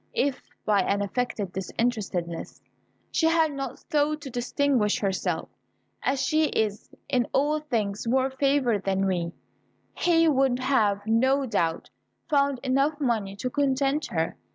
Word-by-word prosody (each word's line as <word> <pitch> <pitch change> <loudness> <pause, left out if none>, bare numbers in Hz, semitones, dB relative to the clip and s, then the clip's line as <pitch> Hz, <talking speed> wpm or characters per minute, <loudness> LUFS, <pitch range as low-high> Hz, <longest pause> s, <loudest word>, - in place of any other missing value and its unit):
If, 285 - 0 0.2
by 205 -2 +3
an 200 +2 0
affected 205 -3 -2
disinterestedness, 190 -4 -3 0.5
she 320 - +2
had 325 -1 +3
not 270 -2 -5
sought 300 -1 0
to 275 -3 -7
distinguish 245 -2 +1
herself, 195 -2 -1 0.5
as 270 0 0
she 310 +3 +2
is 215 -7 -1 0.2
in 255 -4 +1
all 295 +3 +2
things 225 -8 -2
more 260 +2 +2
favoured 265 -6 +1
than 195 0 +1
we, 175 -3 -1 0.6
he 330 -2 +3
would 270 -4 +3
have, 215 -6 +1
no 260 +5 +3
doubt, 170 -8 -1 0.4
found 280 -3 +2
enough 275 +3 +1
money 220 -8 -1
to 250 +5 -4
content 275 +1 +1
her. 165 -2 -1
255 Hz, 135 wpm, -26 LUFS, 205-280 Hz, 0.6 s, by